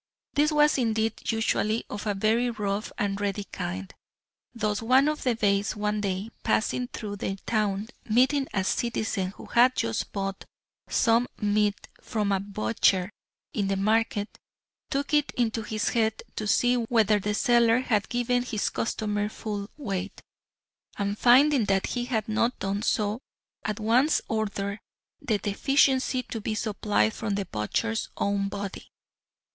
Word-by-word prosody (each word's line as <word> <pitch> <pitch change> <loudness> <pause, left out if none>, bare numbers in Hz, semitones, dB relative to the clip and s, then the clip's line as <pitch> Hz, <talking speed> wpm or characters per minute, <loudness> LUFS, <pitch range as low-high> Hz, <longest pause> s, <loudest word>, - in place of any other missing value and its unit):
This 300 +2 +3
was 300 -1 +4
indeed 225 -2 0
usually 225 0 0
of 205 +1 -6
a 205 - 0
very 225 +5 +2
rough 210 -2 -2
and 200 0 -1
ready 205 0 -1
kind. 95 - -5 0.6
Thus 215 -3 -1
one 260 +5 +4
of 305 0 -1
the 250 -3 +1
Beys 200 -2 +1
one 210 0 -1
day 195 +2 -2
passing 245 +3 0
through 205 -4 -6
the 195 0 -3
town 210 -2 0 0.2
meeting 260 +5 +3
a 190 - 0
citizen 220 -2 -1
who - - -10
had 250 +2 +4
just 230 -1 -1
bought 195 -1 -3 0.5
some 235 +1 +3
meat 210 0 +1
from 210 -4 -1
a 195 - +2
butcher 185 - +1 0.4
in 205 -7 0
the 195 - +1
market, 215 +1 0 0.5
took 280 +2 -2
it 295 -1 +3
into 230 -2 +1
his 215 0 -1
head 220 -2 0
to 215 - -3
see 245 +4 +3
whether 225 -3 +3
the 210 +1 -1
seller 235 +1 +4
had 215 -5 0
given 245 0 +1
his 235 -4 -1
customer 210 -2 -1
full 205 -2 -5
weight, 195 -8 -4 0.8
and 200 0 -1
finding 260 0 +5
that 195 -1 +1
he 245 -1 -2
had 225 -4 -1
not 230 +3 +1
done 195 +1 -2
so 215 0 0 0.4
at 215 0 -3
once 245 +8 +3
ordered 200 -2 -2 0.4
the 220 -4 +1
deficiency 260 +5 +2
to 225 - -6
be 215 +1 -2
supplied 205 - +1
from 210 -3 -2
the 200 -1 -2
butcher's 190 - -2
own 200 0 0
body. 200 -1 -6
215 Hz, 150 wpm, -27 LUFS, 200-240 Hz, 0.8 s, finding